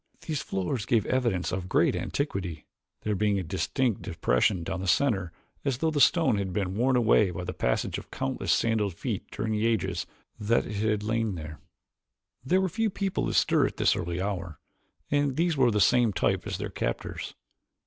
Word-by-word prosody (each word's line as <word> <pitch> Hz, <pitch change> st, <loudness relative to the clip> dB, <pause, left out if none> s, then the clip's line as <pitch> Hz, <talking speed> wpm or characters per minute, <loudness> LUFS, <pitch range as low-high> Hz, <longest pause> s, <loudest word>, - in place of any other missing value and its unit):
These 155 Hz, -3 st, -2 dB
floors 100 Hz, +4 st, -2 dB
gave 115 Hz, -4 st, +2 dB
evidence 120 Hz, -9 st, 0 dB
of 95 Hz, -1 st, -3 dB
great -, -, +3 dB
antiquity, 95 Hz, -, -3 dB, 0.4 s
there 105 Hz, -, 0 dB
being 105 Hz, 0 st, +1 dB
a 95 Hz, -, -1 dB
distinct 110 Hz, -, -1 dB
depression 85 Hz, -, +1 dB
down 95 Hz, +1 st, -3 dB
the 95 Hz, -, -4 dB
center 95 Hz, -7 st, +2 dB, 0.3 s
as 135 Hz, -4 st, 0 dB
though 160 Hz, +4 st, +1 dB
the 145 Hz, -2 st, +1 dB
stone 160 Hz, -, +4 dB
had 95 Hz, -2 st, -2 dB
been 95 Hz, -1 st, -1 dB
worn 125 Hz, +5 st, +2 dB
away 110 Hz, -4 st, +4 dB
by 90 Hz, +1 st, -5 dB
the -, -, -4 dB
passage -, -, -1 dB
of -, -, -14 dB
countless 65 Hz, -, -2 dB
sandaled 105 Hz, -5 st, +1 dB
feet -, -, -4 dB
during 110 Hz, +1 st, -3 dB
the 110 Hz, +1 st, +1 dB
ages 110 Hz, -6 st, -1 dB, 0.3 s
that 110 Hz, +3 st, +2 dB
it 105 Hz, -, -5 dB
had 105 Hz, 0 st, 0 dB
lain 110 Hz, -2 st, 0 dB
there. 75 Hz, -2 st, -8 dB, 0.8 s
There 185 Hz, +9 st, +2 dB
were 190 Hz, -, +1 dB
few 225 Hz, +5 st, 0 dB
people 195 Hz, -1 st, -1 dB
astir -, -, +3 dB
at -, -, -8 dB
this -, -, +3 dB
early 85 Hz, +1 st, -3 dB
hour, 90 Hz, -4 st, -3 dB, 0.5 s
and 145 Hz, -2 st, +2 dB
these 170 Hz, +1 st, +1 dB
were 130 Hz, -3 st, +4 dB
of 115 Hz, -, +2 dB
the 105 Hz, -, +2 dB
same 120 Hz, 0 st, +4 dB
type -, -, 0 dB
as -, -, -3 dB
their -, -, -5 dB
captors. -, -, -4 dB
105 Hz, 190 wpm, -28 LUFS, 95-130 Hz, 0.8 s, stone